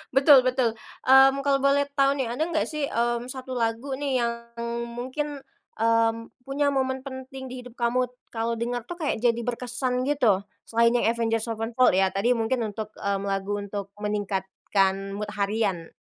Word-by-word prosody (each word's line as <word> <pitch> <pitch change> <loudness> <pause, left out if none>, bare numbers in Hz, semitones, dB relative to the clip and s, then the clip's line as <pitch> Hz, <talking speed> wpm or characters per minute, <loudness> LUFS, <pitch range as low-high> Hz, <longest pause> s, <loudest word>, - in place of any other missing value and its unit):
Betul, 275 -1 +8
betul. 255 -3 +1 0.3
Mmm, 270 +1 +7
kalo 275 -1 +3
boleh 280 +1 +3
tau 275 0 +5
nih, 255 -4 -1
ada 310 - 0
nggak 320 -2 +1
sih, 300 -2 -2
mmm, 240 +1 -1
1 260 0 -6
lagu 235 +3 -1
nih, 270 -3 0
yang 235 0 +1 0.6
mungkin, 280 +3 -4 0.4
mmm, 230 0 +3 0.3
punya 285 +2 0
momen 260 0 -1
penting 265 0 -7
di 255 0 -7
hidup 250 0 -13
kamu, 245 +1 +1 0.2
kalo 230 0 -1
dengar 240 +1 -2
tuh 350 - -5
kayak 290 -8 -2
jadi 235 -1 +2
berkesan 250 +1 -2
gitu, 225 -10 +3 0.2
selain 230 +1 +3
yang 240 - +2
Avenged 225 -1 0
Sevenfold 230 0 +2
ya, 190 0 +4
tadi. 200 +6 +1
Mungkin 230 +2 0
untuk, 215 0 -5
mmm, 200 0 -1
lagu 195 +1 -1
untuk 200 0 -6
meningkatkan 195 -1 -1
mood 210 0 -4
harian. 200 -5 -1
240 Hz, 165 wpm, -26 LUFS, 220-265 Hz, 0.6 s, Betul